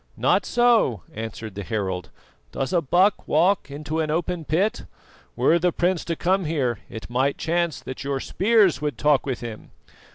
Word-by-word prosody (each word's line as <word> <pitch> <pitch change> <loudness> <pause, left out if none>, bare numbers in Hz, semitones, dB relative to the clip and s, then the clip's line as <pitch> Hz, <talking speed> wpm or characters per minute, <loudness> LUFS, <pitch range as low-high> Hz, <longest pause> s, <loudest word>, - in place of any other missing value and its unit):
"Not - - +2
so," 240 - +3
answered 110 -1 -6
the 100 - -6
herald. 95 -4 -3 0.4
"Does 135 +7 -3
a 175 - +3
buck 180 +7 +2
walk 175 +1 +2
into 150 +3 -4
an 155 -1 0
open 165 +1 -2
pit? 190 +9 0 0.5
Were 170 - +3
the 180 +1 +2
prince 175 +1 0
to 165 - -2
come 185 +2 +1
here 135 -8 -1
it 110 - -8
might 130 +3 0
chance 170 -2 -1
that 130 - -7
your 140 -1 -2
spears 195 - +2
would 150 -1 -2
talk 150 -2 +2
with 130 -3 -3
him. 115 -3 -8
155 Hz, 170 wpm, -24 LUFS, 130-180 Hz, 0.5 s, so